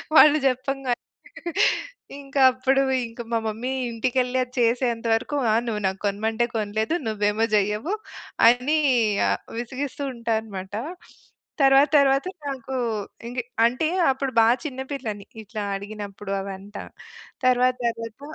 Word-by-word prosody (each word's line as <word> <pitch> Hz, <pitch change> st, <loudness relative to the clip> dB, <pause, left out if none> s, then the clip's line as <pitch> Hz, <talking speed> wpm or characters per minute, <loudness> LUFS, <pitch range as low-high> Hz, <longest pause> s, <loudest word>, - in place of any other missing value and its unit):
వాళ్ళు 305 Hz, 0 st, +8 dB
చెప్పంగానే. 260 Hz, -1 st, -1 dB, 1.2 s
ఇంకప్పుడు 270 Hz, -1 st, +3 dB, 0.3 s
ఇంకా 230 Hz, +1 st, -8 dB
మా 230 Hz, -, +2 dB
మమ్మీ 230 Hz, +5 st, -3 dB, 0.2 s
ఇంటికేళ్లి 250 Hz, +2 st, 0 dB
అది 250 Hz, -, -11 dB
చేసేంత 235 Hz, 0 st, +1 dB
వరకు, 225 Hz, +6 st, -1 dB, 0.2 s
ఆ! -, -, +3 dB
నువ్వు 210 Hz, -2 st, -2 dB
నాకు 190 Hz, 0 st, -3 dB
కొనమంటే 220 Hz, +3 st, 0 dB
కొనలేదు, 220 Hz, +7 st, -1 dB
నువ్వేమో 210 Hz, +1 st, +1 dB
చెయ్యవు 210 Hz, -, 0 dB, 0.5 s
అని 250 Hz, +6 st, +4 dB, 0.8 s
విసిగిస్తూ 265 Hz, +4 st, -4 dB
ఉంటానమాట. 220 Hz, -5 st, -3 dB, 0.9 s
తరువాత 275 Hz, +1 st, +6 dB
తరువాత 275 Hz, +4 st, +3 dB, 0.2 s
నాకు 265 Hz, -1 st, -5 dB, 0.5 s
ఇంక 250 Hz, +1 st, -4 dB, 0.3 s
అంటే 255 Hz, +7 st, +1 dB, 0.2 s
అప్పుడు 265 Hz, 0 st, -2 dB
బా 225 Hz, -, +7 dB, 0.2 s
చిన్న 265 Hz, -3 st, -5 dB
పిల్లని, 215 Hz, -7 st, -4 dB, 0.2 s
ఇట్లా 215 Hz, 0 st, -6 dB
అడిగినప్పుడు 200 Hz, 0 st, -7 dB
అవంట. 195 Hz, +1 st, -8 dB, 0.7 s
తర్వాత 250 Hz, 0 st, +4 dB, 0.2 s
తర్వాత 230 Hz, +2 st, -9 dB
240 Hz, 110 wpm, -24 LUFS, 215-265 Hz, 1.2 s, వాళ్ళు